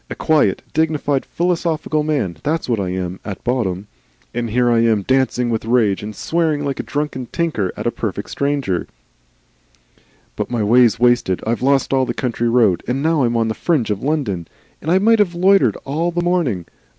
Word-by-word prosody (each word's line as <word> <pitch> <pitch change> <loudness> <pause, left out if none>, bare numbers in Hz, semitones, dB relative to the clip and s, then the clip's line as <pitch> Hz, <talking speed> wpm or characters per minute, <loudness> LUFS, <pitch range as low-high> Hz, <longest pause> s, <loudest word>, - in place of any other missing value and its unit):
A - - -5
quiet, 155 -2 +2
dignified, 150 -3 0
philosophical 165 -3 -1
man, 140 - -1
that's 160 +2 -1
what 115 -4 0
I 95 -2 -2
am 90 0 -4
at 100 -3 -7
bottom; 105 -7 -1 0.5
and 120 -1 -2
here 120 +2 +2
I 115 - +3
am 110 -3 +2
dancing 130 -1 +1
with 110 - -1
rage 115 -4 +2
and 105 0 -7
swearing 160 -3 0
like 140 -1 -3
a - - -2
drunken 145 -4 -3
tinker 130 - -1
at - - -5
a - - +1
perfect - - -4
stranger 140 -10 -1 1.5
"But - - -3
my 120 -3 -1
day's 115 +1 +4
wasted. 120 -6 +2
I've 115 +2 -1
lost 135 +1 +2
all 130 -1 +2
that 120 - -4
country 120 -2 -1
road, 115 -7 +3
and 135 +3 -1
now 160 -2 +2
I'm 120 0 0
on 115 -1 +1
the 110 - -1
fringe 135 -5 0
of 105 0 -2
London. 125 - -2 0.3
And 155 - -4
I 180 - +4
might 225 +3 +4
have 180 -4 +2
loitered 185 - +4
all 160 +5 -1
the 175 0 -2
morning! 160 - 0
125 Hz, 190 wpm, -19 LUFS, 110-155 Hz, 1.5 s, day's